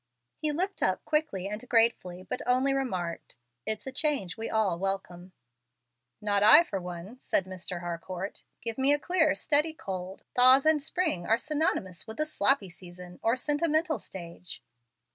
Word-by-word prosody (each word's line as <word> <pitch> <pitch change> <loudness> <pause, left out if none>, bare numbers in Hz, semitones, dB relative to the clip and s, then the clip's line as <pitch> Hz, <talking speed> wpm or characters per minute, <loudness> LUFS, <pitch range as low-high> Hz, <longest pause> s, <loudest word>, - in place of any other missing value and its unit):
He 305 0 0
looked 370 +6 -2
up - - 0
quickly 300 - -1
and 210 +5 -6
gratefully, 225 -6 +2
but - - -3
only 260 +2 +3
remarked, 185 - -3 0.3
"It's 220 -1 -2
a 265 - -5
change 265 - 0
we 225 0 -5
all 205 -6 0
welcome." 190 -2 -4 0.9
"Not 205 -1 0
I, 215 +10 +9
for 195 - -5
one," 180 +7 -8
said 190 - 0
Mr. 185 -1 -5
Harcourt. 175 +3 -6 0.2
"Give 230 +1 -4
me 270 +2 +5
a - - +3
clear, 325 -2 +2
steady 305 +1 +2
cold. 190 - -6
Thaws 255 +3 +7
and 315 -1 +4
spring 310 - -2
are 225 - +4
synonymous 245 - -2
with 220 - -8
the 305 - 0
sloppy 270 - +1
season 180 0 -12
or 230 +2 +2
sentimental 310 +3 0
stage." 170 -1 -7
220 Hz, 160 wpm, -28 LUFS, 185-290 Hz, 0.9 s, I